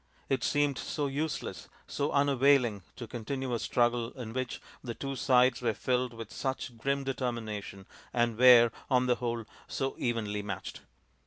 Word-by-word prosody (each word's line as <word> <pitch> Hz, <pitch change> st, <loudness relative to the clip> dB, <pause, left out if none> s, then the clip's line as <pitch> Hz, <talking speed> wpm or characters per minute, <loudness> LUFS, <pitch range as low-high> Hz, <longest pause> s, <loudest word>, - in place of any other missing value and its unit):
It 130 Hz, -3 st, +1 dB
seemed 145 Hz, +3 st, +1 dB
so 150 Hz, -, -2 dB
useless, 145 Hz, +2 st, -3 dB, 0.2 s
so 145 Hz, +1 st, -2 dB
unavailing 140 Hz, -6 st, +3 dB
to 120 Hz, -, -6 dB
continue 125 Hz, +3 st, -4 dB
a 120 Hz, -, 0 dB
struggle 120 Hz, 0 st, +1 dB
in 120 Hz, -4 st, -7 dB
which 130 Hz, 0 st, -3 dB, 0.2 s
the 120 Hz, -3 st, -5 dB
two 135 Hz, 0 st, -4 dB
sides 125 Hz, -1 st, +3 dB
were 115 Hz, -3 st, 0 dB
filled 125 Hz, 0 st, 0 dB
with 115 Hz, -1 st, -8 dB
such 130 Hz, -2 st, -3 dB
grim 140 Hz, +4 st, -1 dB
determination 115 Hz, -7 st, -4 dB, 0.3 s
and 120 Hz, -2 st, +1 dB
were, 120 Hz, -1 st, +8 dB, 0.2 s
on 125 Hz, -2 st, +3 dB
the 125 Hz, -1 st, +2 dB
whole, 115 Hz, -2 st, -2 dB, 0.2 s
so 135 Hz, -1 st, -2 dB
evenly 110 Hz, -4 st, -1 dB
matched. 100 Hz, -2 st, -6 dB
125 Hz, 155 wpm, -30 LUFS, 115-135 Hz, 0.3 s, were